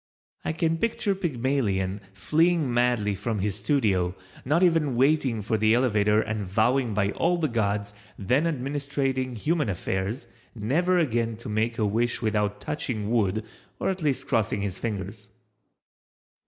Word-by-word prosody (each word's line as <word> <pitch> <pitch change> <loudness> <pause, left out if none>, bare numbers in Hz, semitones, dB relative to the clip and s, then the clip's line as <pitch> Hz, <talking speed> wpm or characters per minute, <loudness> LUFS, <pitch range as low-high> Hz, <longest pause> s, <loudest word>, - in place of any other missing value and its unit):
I - - -1
can 165 0 0
picture 220 -1 0
Pygmalion 120 - -1
fleeing 155 - +1
madly 120 -4 +2
from 110 +3 -3
his 100 +1 -1
studio, 100 -7 +1 0.3
not 155 +7 +2
even 165 -7 +3
waiting 130 -4 +2
for 110 +2 0
the 110 +2 +4
elevator 105 -4 +3
and 105 -1 -3
vowing 110 +4 +1
by 100 -1 +1
all 175 +1 +1
the 160 -2 +1
gods, 100 -4 -1 0.2
then 130 - +1
administrating 135 -3 -2
human 150 +2 0
affairs, 95 +5 -2 0.3
never 160 - +1
again 115 -8 0
to 115 - -8
make 110 +2 0
a 110 - +1
wish 115 +3 +1
without 105 -2 0
touching 110 -7 -3
wood 110 -2 +1 0.3
or - - 0
at 190 -1 -2
least 145 -4 -1
crossing 110 -5 +1
his 100 -2 -3
fingers. 100 -4 -5
115 Hz, 145 wpm, -26 LUFS, 105-145 Hz, 0.3 s, the